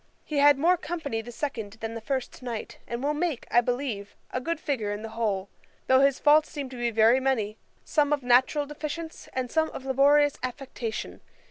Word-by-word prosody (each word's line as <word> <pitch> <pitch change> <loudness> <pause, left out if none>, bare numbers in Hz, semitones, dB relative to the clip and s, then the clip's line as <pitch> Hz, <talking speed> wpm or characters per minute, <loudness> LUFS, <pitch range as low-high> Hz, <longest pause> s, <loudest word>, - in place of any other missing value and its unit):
He 300 - -3
had 290 -1 +7
more 345 +6 +4
company 320 -10 -3
the 240 +2 -9
second 230 -6 -4
than 225 0 -6
the 230 - -6
first 260 +2 -3
night, 235 -3 -6
and 235 +2 -4
will 295 +1 +1
make, 305 -4 -2
I 240 - +6
believe, 245 -5 -3 0.2
a 255 - -2
good 335 +4 -2
figure 255 -10 -2
in 205 +1 -4
the 225 - -5
whole, 205 -4 -1 0.4
though 260 0 +5
his 275 0 +4
faults 305 +1 +5
seem 280 -3 -5
to 255 - -9
be 240 -1 0
very 225 +3 +5
many; 225 -6 -1 0.3
some 295 -2 +2
of 290 -3 +1
natural 255 +4 +4
deficience, 305 +3 -6
and 255 -2 -3
some 320 -1 +2
of 265 - -8
laborious 285 +2 +4
affectation. 250 -3 -5
260 Hz, 200 wpm, -27 LUFS, 230-290 Hz, 0.4 s, had